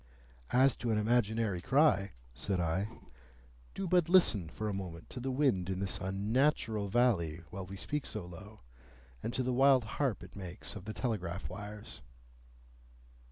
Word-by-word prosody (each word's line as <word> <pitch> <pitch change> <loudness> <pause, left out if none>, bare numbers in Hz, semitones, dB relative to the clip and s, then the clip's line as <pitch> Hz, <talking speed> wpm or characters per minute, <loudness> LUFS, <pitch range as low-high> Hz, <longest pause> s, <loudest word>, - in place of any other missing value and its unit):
"As 130 +2 +4
to 120 - -3
an 110 - +2
imaginary 110 -3 +1
cry," 105 - +3 0.2
said 95 +8 -2
I, 85 +4 0 0.9
"do 195 - -2
but 175 -1 +3
listen 115 - +5
for 110 +6 -4
a 105 - -1
moment 90 -4 -6
to 125 - -5
the 130 +2 -3
wind 130 -10 +1
in 95 -1 -2
this 95 -1 0
unnatural 105 +2 +1
valley 95 -8 +2
while 95 -2 -6
we 95 +1 -7
speak 150 +8 -3
so 105 -5 -5
low, 100 +5 -11 0.6
and - - -3
to 130 - +1
the 125 0 0
wild 135 0 +5
harp 120 +2 -1
it - - -12
makes 95 +1 -6
of 100 -2 -8
the 110 - -4
telegraph 95 -7 -2
wires." 105 -2 -8
105 Hz, 160 wpm, -33 LUFS, 95-125 Hz, 0.9 s, listen